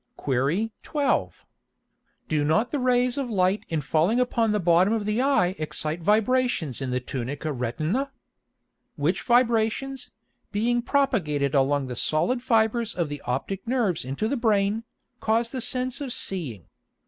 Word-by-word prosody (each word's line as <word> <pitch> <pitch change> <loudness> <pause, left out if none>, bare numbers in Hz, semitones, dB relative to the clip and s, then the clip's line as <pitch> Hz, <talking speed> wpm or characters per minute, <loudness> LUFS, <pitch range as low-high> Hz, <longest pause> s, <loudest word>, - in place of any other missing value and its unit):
Qu. 145 - 0
12. 290 -4 -1 0.8
Do 150 -2 +1
not 215 +11 +1
the 290 - -1
Rays 250 +1 +2
of 265 -3 -3
Light 190 -1 +1
in 160 -2 -1
falling 160 - +2
upon 235 -3 +1
the 210 - +1
bottom 180 +3 +4
of 220 -2 -1
the 210 +3 0
Eye 225 -10 +2
excite 155 +1 -2
Vibrations 210 - +1
in 135 - -2
the 125 0 0
Tunica 135 +4 -4
Retina? 155 - -2 0.8
Which 165 +7 0
Vibrations, 240 +2 +1 0.4
being 240 +3 +1
propagated 175 - +1
along 140 0 +2
the 125 -1 -5
solid 240 - +1
Fibres 230 -1 +1
of 170 -4 -1
the 145 -1 -6
optick 180 - -3
Nerves 230 -9 0
into 135 - -2
the 280 - -1
Brain, 215 -1 +1 0.3
cause 230 +1 +1
the 260 - -3
Sense 255 +2 0
of 270 -3 -4
seeing. 150 - -2
210 Hz, 150 wpm, -25 LUFS, 155-245 Hz, 0.8 s, bottom